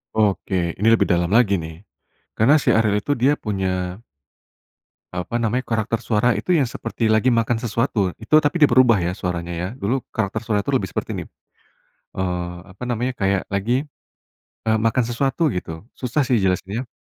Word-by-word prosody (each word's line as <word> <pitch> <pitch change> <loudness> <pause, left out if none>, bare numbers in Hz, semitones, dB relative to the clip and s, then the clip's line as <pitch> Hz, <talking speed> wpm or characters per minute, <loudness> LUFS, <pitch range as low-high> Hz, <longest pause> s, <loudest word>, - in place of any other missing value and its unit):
Oke, 95 -5 0
ini 105 - 0
lebih 115 - +4
dalam 85 -1 +1
lagi 110 -3 +4
nih, 80 +2 -7 0.5
karena 125 +7 +5
si - - -10
Ariel 110 -2 +2
itu 145 +6 0
dia 130 +4 +3
punya 95 -2 -2 1.1
eee, 90 - -2
apa 115 - -7
namanya, 120 +3 0
karakter 115 0 -1
suara 115 +2 +3
itu - - -2
yang 150 - +3
seperti 115 - -5
lagi 110 +3 +3
makan 115 0 0
sesuatu, 115 0 -1 0.2
itu 155 - +2
tapi 145 +2 0
dia 145 - +6
berubah 120 -3 +6
ya, 85 - 0
suaranya 90 -2 -4
ya. 85 +2 -3
Dulu 105 +6 +1 0.2
karakter 105 -4 -1
suara 105 -2 0
itu - - -2
lebih - - +1
seperti - - -3
ini, - - -4 0.9
eee, 90 -2 -2 0.2
apa 100 - -15
namanya 125 +1 -1
kayak 95 -1 +1
lagi, 110 +7 0 0.9
eee, 110 0 +3
makan 115 +3 +2
sesuatu 135 +6 0
gitu. 80 -3 -5 0.2
Susah 130 +3 0
sih 130 -3 +2
jelasinnya. 95 +5 -1
110 Hz, 175 wpm, -21 LUFS, 95-120 Hz, 1.1 s, dia